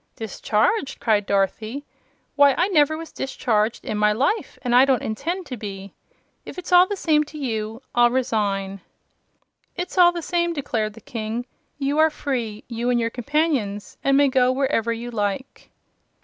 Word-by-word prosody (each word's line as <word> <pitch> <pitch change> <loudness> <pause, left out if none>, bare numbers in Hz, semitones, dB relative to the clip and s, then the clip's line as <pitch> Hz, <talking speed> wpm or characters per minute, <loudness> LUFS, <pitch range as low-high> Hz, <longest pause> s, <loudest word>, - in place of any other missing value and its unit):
"Discharged!" 225 - -1
cried 210 -3 +1
Dorothy. 215 +7 -1 0.5
"Why, 285 -1 +5
I 360 +3 +2
never 315 -3 +3
was 325 0 -8
discharged 225 -4 -1
in 210 - -2
my 210 0 +4
life, 280 - -1
and 245 -2 0
I 250 +1 +7
don't 265 -4 +2
intend 335 - -3
to 255 -4 -6
be. 200 -2 -8 0.5
If - - -10
it's 360 - -7
all 360 +1 +7
the 410 - -2
same 310 -5 +2
to 300 +1 -11
you, 225 -3 -4
I'll 240 0 +5
resign." 200 -6 -1 0.9
"It's 355 +1 -3
all 350 -1 +8
the 345 -1 -5
same," 345 +1 0
declared 225 -8 -2
the 225 - -14
King. 225 +2 -4 0.3
"You 285 +1 -1
are 315 0 +6
free 240 -8 -4
you 235 0 -2
and 245 -1 +2
your 230 0 -1
companions 250 -6 -1
and 275 0 +3
may 285 0 +5
go 255 -1 +3
wherever 255 -4 0
you 235 +1 -5
like." 210 +3 -4
250 Hz, 170 wpm, -23 LUFS, 215-295 Hz, 0.9 s, all